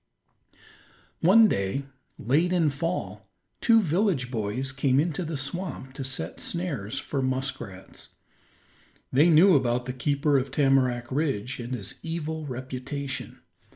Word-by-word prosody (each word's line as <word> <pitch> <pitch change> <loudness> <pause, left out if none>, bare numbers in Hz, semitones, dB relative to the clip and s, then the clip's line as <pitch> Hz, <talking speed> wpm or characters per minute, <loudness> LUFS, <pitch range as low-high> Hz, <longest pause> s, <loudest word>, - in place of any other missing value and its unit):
One 215 +6 +7
day, 100 - -1 0.3
late 150 - +1
in 165 -5 +3
fall, 165 +6 -4 0.3
two 225 -2 +5
village 165 - +1
boys 115 +3 -2
came 135 0 +2
into 165 +3 0
the 160 -2 -4
swamp 140 -1 -4
to 135 - -5
set 130 -11 -4
snares 145 - -3
for 140 - -2
muskrats. 130 -8 -4 1.0
They 150 +6 +5
knew 170 +3 +7
about 125 -2 +1
the 125 - -4
keeper 140 +2 +1
of 130 - -4
Tamarack 130 -4 +2
Ridge 135 -4 -1
and 120 +1 -4
his 100 -4 -7
evil 160 -2 -4
reputation. 130 +1 -5
135 Hz, 125 wpm, -26 LUFS, 125-160 Hz, 1.0 s, One